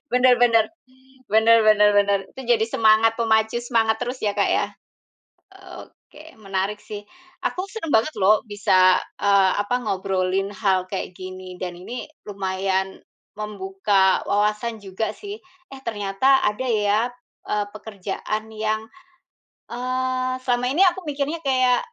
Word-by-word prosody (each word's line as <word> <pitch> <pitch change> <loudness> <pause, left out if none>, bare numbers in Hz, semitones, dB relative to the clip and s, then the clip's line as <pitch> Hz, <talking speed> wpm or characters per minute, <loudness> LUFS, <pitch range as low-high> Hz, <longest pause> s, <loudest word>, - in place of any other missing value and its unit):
Benar 250 0 +5
benar. 230 -2 +5 0.7
Benar 220 +2 +6
benar 210 -1 +5
benar. 200 0 +3
Itu 265 - -10
jadi 230 -2 +3
semangat 225 0 +4
pemacu 220 0 +1
semangat 225 -2 +1
terus 250 +1 -4
ya 205 -2 0
Kak - - +1
ya. - - +1 1.2
Oke, 315 +2 -17
menarik 195 +1 -2
sih. 205 -1 -8 0.4
Aku 370 +2 -2
senang 390 -8 -5
banget 225 +8 +2
lho 210 +3 +4
bisa, 185 -3 +4 0.2
eee, 200 -2 +4
apa, 205 +4 -1
ngobrolin 190 -1 -1
hal 190 -2 0
kayak 185 -1 -4
gini, 185 0 -9
dan 180 -1 -5
ini 210 +8 -7 0.2
lumayan 190 -1 -2 0.3
membuka 195 -2 +1
wawasan 210 +2 0
juga 195 +2 -4
sih, 415 +1 -8 0.3
eh 270 - -9
ternyata 220 +5 +2
ada 210 +5 0
ya, 210 -2 +2 0.5
eee, 210 -1 0
pekerjaan 215 +1 -5
yang, 215 0 -1 0.9
eee, 255 +1 -2
selama 245 -1 0
ini 340 +8 +4
aku 370 -1 +3
mikirnya 295 +3 -2
kayak, 255 -2 +3
215 Hz, 130 wpm, -22 LUFS, 195-245 Hz, 1.2 s, Benar